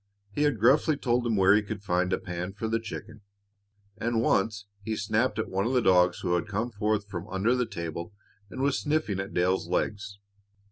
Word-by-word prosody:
He 105 - -3
had 145 -7 +2
gruffly 140 +6 +4
told 120 -2 0
him 115 - +1
where 95 0 +5
he 105 - +4
could 105 -1 -6
find 90 -1 0
a - - +2
pan 90 +1 -5
for 105 +3 -4
the 115 +1 0
chicken, 110 -1 -8 0.8
and 115 0 0
once 105 0 +1 0.2
he 110 +2 -3
snapped 110 +4 0
out 110 - 0
at - - -13
one 95 +3 0
of 130 - -1
the 125 - +4
dogs 90 -3 +4
who 90 -2 0
had 85 -2 0
come 110 +4 -2
forth 105 -1 -1
from 95 -1 -6
under 105 +4 +1
the 125 -2 0
table 85 +2 -5 0.4
and 130 +4 -4
was 140 0 +2
sniffing 150 -10 0
at 95 0 -4
Dale's 90 0 +1
legs. 100 +2 -2
105 Hz, 215 wpm, -28 LUFS, 95-115 Hz, 0.8 s, where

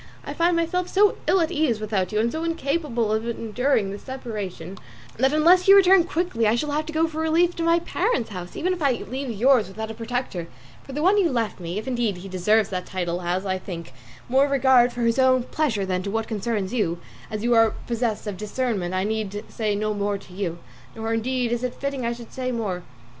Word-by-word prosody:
I - - -5
find 340 +1 +2
myself 335 +2 0
so 405 +2 +3
ill 380 - +4
at 320 - 0
ease 285 -8 +1
without 205 -4 -1
you, 210 - 0
and 230 +2 +1
so 320 +1 -3
incapable 285 -8 -1
of 220 +2 -1
enduring 230 -1 0
this 200 - -7
separation, 205 -8 -6 0.4
that 265 +3 +3
unless 340 +5 +5
you 390 - +9
return 380 -2 +6
quickly 330 -10 0
I 215 - +3
shall 295 +5 -2
have 305 +2 -1
to - - -4
go 320 +1 +3
for 315 0 -6
relief 335 +2 +2
to 335 - -1
my 335 0 +4
parents' 345 - -1
house, 180 -2 -7
even 370 +2 0
if 355 - -6
I 280 -3 +3
leave 260 +3 -5
yours 235 0 +3
without 220 +3 -6
a - - -6
protector; 230 -6 -4 0.4
for 270 - -10
the 295 +3 -2
one 395 +4 +5
you 360 -4 +3
left 230 -5 -1
me, 175 +2 -4
if 215 - -5
indeed 235 -6 0
he 180 +2 -9
deserved 195 +3 +2
that 180 -1 -3
title, 175 -2 -2
has, 180 +2 -2
I 185 -1 -1
think, 170 -7 -8 0.3
more 270 +3 +4
regard 260 -3 +4
to 245 - -4
his 230 +2 +2
own 255 -1 +4
pleasure 245 -8 -1
than 185 -1 -1
to 200 - -4
what 225 +2 -2
concerns 215 -2 -2
you: 175 -8 0 0.3
as 215 0 -4
you 240 0 +3
are 225 -1 +4
possessed 235 -2 -2
of 205 -3 -4
discernment 210 -4 -2
I 185 - +1
need 210 -1 -3
say 215 -2 -1
no 215 +1 -1
more 205 0 -1
to 190 -2 -15
you, 180 -3 -3 0.4
nor 225 0 -2
indeed 245 +1 0
is 240 +1 -1
it 250 - -2
fitting 275 -3 -3
I 235 - 0
should 235 -1 -11
say 255 -1 -2
more." 205 -7 -2
235 Hz, 230 wpm, -24 LUFS, 205-280 Hz, 0.4 s, you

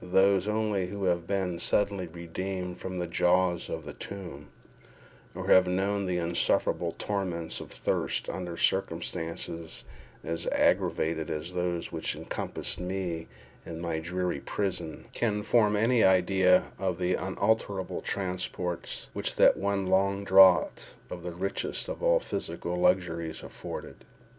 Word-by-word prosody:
Those 95 +1 +3
only 105 -3 0
who 100 +1 -5
have 85 -2 +1
been 95 -3 -1
suddenly 100 -1 +1
redeemed 90 +2 -5
from 95 -1 -5
the 90 - -1
jaws 90 +1 +2
of 80 -2 -4
the 75 - -7
tomb, 90 -7 -8 0.9
or - - -5
who - - +1
have 95 0 +7
known 100 +2 0
the 90 -1 0
insufferable 85 0 +1
torments 90 -5 -3
of - - -10
thirst - - -1
under 90 -2 -4
circumstances 85 -2 -2 0.4
as 80 +1 -3
aggravated 80 -1 +1
as 80 +4 -4
those 90 -1 -2
which - - -2
encompassed - - -3
me 90 -3 -3 0.4
in 85 -1 -7
my 85 -2 -2
dreary 90 -1 -2
prison, 90 -4 -3
can 105 -3 0
form 105 -2 +3
any 115 +2 +3
idea 95 0 +4
of 95 -3 -1
the 90 +1 +1
unutterable 95 +1 0
transports 90 -2 -3
which - - -2
that - - +6
one 100 -1 -1
long 100 +1 +2
draught 95 -3 +5 0.2
of 90 - -5
the 90 +1 -5
richest 95 +3 -3
of - - -5
all - - +4
physical 90 - -3
luxuries 85 -3 +1
afforded. - - -8
90 Hz, 140 wpm, -29 LUFS, 85-95 Hz, 0.9 s, have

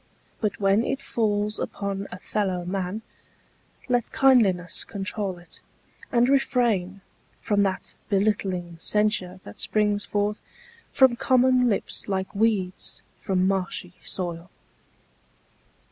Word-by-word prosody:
But 210 -3 -1
when 200 +2 +3
it 270 - -1
falls 210 -5 -1
upon 200 0 -3
a 180 - -6
fellow 185 -3 -2
man 190 +3 -3 0.8
Let 245 -2 +1
kindliness 200 -10 +3
control 200 -2 -3
it; 175 0 -13 0.5
and 240 -1 +4
refrain 235 -8 +1 0.4
From 205 -2 +1
that 190 -1 -1 0.2
belittling 195 -4 0
censure 200 -2 0
that 100 - -12
springs 210 -1 +1
forth 205 +1 -1 0.5
From 260 -2 +5
common 255 0 +4
lips 205 - -2
like 190 -1 -2
weeds 200 -4 -1 0.2
from 190 -3 +1
marshy 185 -2 -2
soil. 175 -1 -4
200 Hz, 110 wpm, -25 LUFS, 185-220 Hz, 0.8 s, From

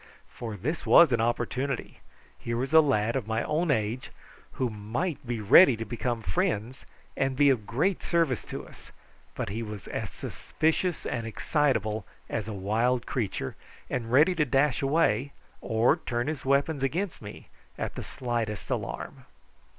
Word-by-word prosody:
For 110 -3 -6
this 155 +10 -3
was 170 -5 +7
an 115 -2 +2
opportunity 120 +3 -2 0.4
here 115 -1 -3
was 130 +5 -2
a 160 - +9
lad 115 -6 +1
of 125 -6 -2
my 110 0 0
own 160 +3 0
age 115 -1 0 0.4
who 130 - 0
might 110 - -3
be 120 -1 -2
ready 120 - +7
to 115 - -4
become 120 +1 -3
friends 105 +8 -2 0.3
and 135 0 0
be 140 +1 +5
of 110 -6 -1
great 160 - 0
service 165 -9 +1
to - - -7
us; - - -16 0.4
but - - -3
he 110 +4 -3
was 105 -4 -7
as - - -4
suspicious 160 +2 -2
and 115 -2 -3
excitable 110 -4 0 0.3
as 110 -2 -2
a - - -4
wild 110 +5 0
creature, 105 - -3 0.4
and 115 -3 -2
ready 150 +8 +5
to 160 -3 +2
dash 135 0 +2
away 140 -3 +2 0.3
or 115 +7 +2
turn 120 -6 -2
his 155 -2 -3
weapons 140 +2 +2
against 170 +7 -2
me 105 -1 -10 0.3
at - - -3
the - - -6
slightest 120 -5 -3
alarm. - - -4
125 Hz, 160 wpm, -28 LUFS, 110-145 Hz, 0.4 s, a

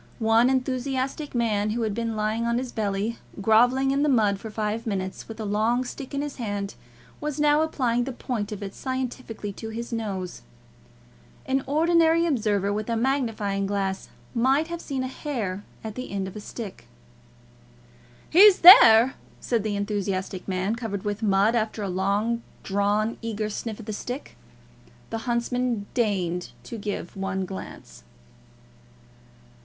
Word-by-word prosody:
One 225 +1 +4
enthusiastic 265 +2 -1
man, 215 -3 +1
who 230 +2 -1
had 215 -2 -1
been 230 0 -2
lying 215 +2 -1
on 235 0 +1
his 250 0 -3
belly, 210 +2 -2 0.2
grovelling 245 +6 +4
in 275 +1 +1
the 300 - +3
mud 210 -6 +3
for 220 - -7
five 215 +2 -3
minutes, 190 -3 -3
with 225 0 -9
a 220 - -3
long 220 +5 +1
stick 270 +2 -7
in 280 - -1
his 295 -1 -6
hand, 205 -4 -3 0.5
was 300 0 -3
now 295 0 +4
applying 245 -6 0
the 270 - -4
point 235 -4 -4
of 210 -1 -5
it 195 -1 -6
scientifically 255 -5 -4
to 220 +3 -7
his 235 +2 -5
nose. 195 - -4 1.0
An 265 0 0
ordinary 330 +2 +3
observer 210 - +1
with 215 +2 -3
a 230 - +1
magnifying 225 -6 0
glass 195 -1 -2 0.2
might 265 +6 +2
have 340 0 -5
seen 270 -3 -3
a - - -2
hair 225 -9 -4 0.2
at 220 -1 -5
the 255 +3 -6
end 195 -1 -2
of 190 - -8
the 210 - -7
stick. 210 -2 -8 1.4
"He's 385 +3 +7
there," 255 - +10 0.3
said 235 -3 0
the 210 0 -2
enthusiastic 200 -2 -2
man, 190 +3 -1
covered 220 -5 -4
with 205 +1 -2
mud, 205 +1 +3
after 220 -2 -1
a 195 - -2
long 200 +5 0 0.2
drawn, 205 +3 0
eager 220 -2 -3
sniff 220 +1 -5
at 225 - -9
the 215 - -4
stick. 250 +6 -6 0.8
The 225 - -2
huntsman 240 -2 0
deigned 185 -7 -1
to 230 - -7
give 200 -4 -5
one 190 -1 -2
glance. 190 +1 -9
225 Hz, 160 wpm, -25 LUFS, 205-255 Hz, 1.4 s, there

